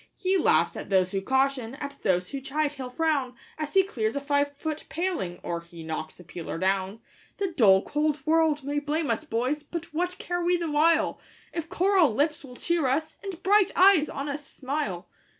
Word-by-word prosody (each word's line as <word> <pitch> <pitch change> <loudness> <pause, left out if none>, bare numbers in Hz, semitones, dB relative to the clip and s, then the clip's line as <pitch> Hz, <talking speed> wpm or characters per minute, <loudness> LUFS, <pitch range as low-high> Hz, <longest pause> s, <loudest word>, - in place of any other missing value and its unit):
He 380 -1 +1
laughs 375 - +3
at - - -7
those 185 -2 +3
who 195 - -1
caution, 265 +1 0
at 280 0 -7
those 180 -1 +1
who 275 - -5
chide 290 +2 -1
he'll 260 -3 -6
frown, 275 -3 0 0.2
As 305 +1 -4
he 385 - +7
clears 225 - -2
a - - 0
five 285 0 +1
foot 310 0 -4
paling, 330 - -2
or 170 -1 -3
he 170 -1 -12
knocks 160 0 -5
a - - -11
peeler 170 -1 -6
down. 190 +3 0 0.4
The 395 -2 -1
dull, 200 - +5
cold 300 0 0
world 315 -2 +3
may 290 +2 -1
blame 295 -1 -1
us, 225 - -1
boys! 255 +6 -1
but 330 +2 -7
what 355 +3 -1
care 350 0 -3
we 350 +1 +2
the 335 -3 -3
while, 315 +1 +3 0.3
If 330 -1 -4
coral 365 - +3
lips 300 +4 0
will 250 -3 -11
cheer 340 0 0
us, 300 +5 -1
and 385 -3 -7
bright 405 0 +4
eyes 370 -5 +6
on 275 +1 -4
us 290 +1 -4
smile? 260 - -4
290 Hz, 200 wpm, -27 LUFS, 230-325 Hz, 0.4 s, he